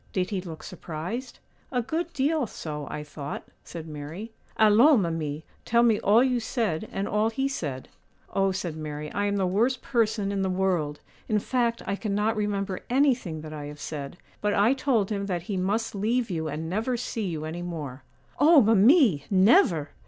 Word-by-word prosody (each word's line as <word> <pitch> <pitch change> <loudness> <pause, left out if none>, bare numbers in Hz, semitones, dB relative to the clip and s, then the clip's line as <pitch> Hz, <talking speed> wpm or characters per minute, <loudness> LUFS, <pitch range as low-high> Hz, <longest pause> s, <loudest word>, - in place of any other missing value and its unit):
Did 185 0 -1
he 195 -3 -1
look 165 -4 -9
surprised?' 180 +8 -6 0.3
'A 250 -3 0
good 330 +7 -2
deal 285 -1 +1
so, 150 -6 -6
I 150 - -5
thought,' 145 -1 -7 0.2
said 165 -2 -8
Mary. 155 +9 -7 0.3
'Allons, 220 +3 +6
mimi, 160 -2 -3 0.2
tell 235 +1 +3
me 225 -3 +4
all 220 +5 +5
you 255 -2 +1
said 220 -6 -2
and 195 +1 -2
all 210 +2 +1
he 270 +4 -1
said.' 145 - -4 0.5
'Oh,' 195 0 +2
said 180 -4 -3
Mary, 150 -1 -6
'I 205 - 0
am 200 - 0
the 195 -2 +1
worst 230 +8 +1
person 220 -4 +1
in 200 -1 -1
the 190 - 0
world; 180 -6 0 0.3
in 215 - +3
fact, 235 +1 0
I 200 - -1
cannot 210 +1 0
remember 200 -2 -2
anything 245 - +1
that 155 0 -8
I 150 -1 -6
have 145 0 -9
said; 140 +1 -6 0.2
but 210 0 +1
I 210 +6 +4
told 250 -7 +1
him 200 -1 -2
that 175 -3 -2
he 200 +2 -4
must 200 +5 -1
leave 225 +3 0
you 160 -2 -2
and 155 +2 -4
never 225 +8 -1
see 225 -3 -3
you 155 -3 -4
any 165 +2 -5
more.' 150 -7 -6 0.4
'Oh, 310 +1 +7
mimi! 220 - +5
never! 190 - +4
200 Hz, 185 wpm, -26 LUFS, 160-230 Hz, 0.5 s, Oh